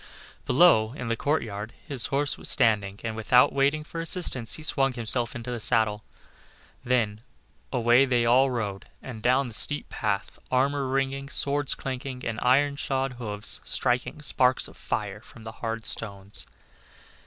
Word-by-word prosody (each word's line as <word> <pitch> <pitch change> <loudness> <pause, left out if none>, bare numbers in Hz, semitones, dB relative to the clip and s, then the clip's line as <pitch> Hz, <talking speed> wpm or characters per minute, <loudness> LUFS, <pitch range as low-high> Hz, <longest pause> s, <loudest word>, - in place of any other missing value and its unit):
Below 125 -8 +4
in 125 -4 -6
the 115 - +1
courtyard 110 -6 -2
his 135 -5 -2
horse 140 +1 0
was - - -4
standing, 100 -3 +2
and 110 -1 -4
without 110 +3 +4
waiting 140 +3 +1
for 165 +1 -6
assistance, 165 -8 0
he 155 - -8
swung 135 -3 +1
himself 120 0 +2
into 120 +1 -6
the 120 - -4
saddle. 105 -1 +2 0.8
Then 110 -4 0 0.5
away 120 +1 +4
they 120 -3 +1
all 130 +3 +4
rode 105 -6 -4 0.2
and 120 -4 -8
down 130 +3 +2
the 115 - -10
steep 145 +7 0
path, 100 -3 -3
armor 135 +2 +1
ringing, 135 +1 -2
swords 145 0 +2
clanking, 130 -1 -6
and 115 -2 -3
iron 140 +3 +3
shod 135 -3 -2
hoofs 105 -1 0
striking 125 +4 -1
sparks 130 -2 +2
of - - -15
fire - - -4
from 115 - -15
the 110 - -7
hard 115 -1 -4
stones. 100 -2 -1
125 Hz, 155 wpm, -26 LUFS, 110-135 Hz, 0.8 s, Below